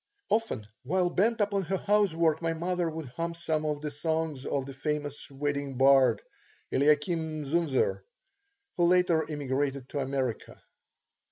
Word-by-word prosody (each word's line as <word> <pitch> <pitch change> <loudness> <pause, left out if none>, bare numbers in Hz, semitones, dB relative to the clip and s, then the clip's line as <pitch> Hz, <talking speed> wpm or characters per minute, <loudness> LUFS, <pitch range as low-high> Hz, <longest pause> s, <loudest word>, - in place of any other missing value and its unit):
Often, 220 - 0 0.2
while 175 +6 +1
bent 225 +6 +2
upon 200 -1 +1
her 190 +4 -1
housework, 170 -6 +2
my 165 -1 0
mother 175 +1 -1
would 160 -4 -6
hum 170 0 -2
some 155 -2 -1
of 150 -1 -2
the 150 -1 -3
songs 160 -2 -2
of 135 -2 -1
the 135 - -8
famous 145 +1 -3
wedding 140 -1 -3
bard, 130 -4 +5 0.5
Eliakim 155 +2 +1
Zunzer, 135 - +1 0.8
who 175 - +4
later 175 -3 +3
emigrated 140 -2 -2
to 145 - -3
America. 135 -3 -3
155 Hz, 140 wpm, -29 LUFS, 140-170 Hz, 0.8 s, bard